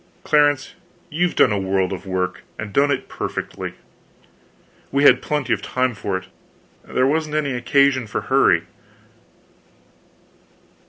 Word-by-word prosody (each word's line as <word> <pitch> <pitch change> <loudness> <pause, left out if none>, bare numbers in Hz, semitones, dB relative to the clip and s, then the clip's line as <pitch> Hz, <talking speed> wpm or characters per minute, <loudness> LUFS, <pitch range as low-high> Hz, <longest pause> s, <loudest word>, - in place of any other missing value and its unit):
"Clarence, 145 -2 +2 0.4
you've 175 +3 0
done 120 - +5
a 100 - 0
world 95 0 0
of 95 - -8
work, 95 -1 -2 0.2
and 105 -2 -7
done 140 +4 +3
it 140 -2 -1
perfectly." - - -5 1.2
"We 140 +1 +1
had - - +6
plenty 145 -5 -1
of 105 - -2
time 130 +2 -1
for 100 -2 -3
it; 95 - -10 0.6
there 130 - 0
wasn't 155 +2 0
any 150 -2 0
occasion 130 0 +2
for - - -3
hurry." - - +3
130 Hz, 130 wpm, -21 LUFS, 100-145 Hz, 1.2 s, had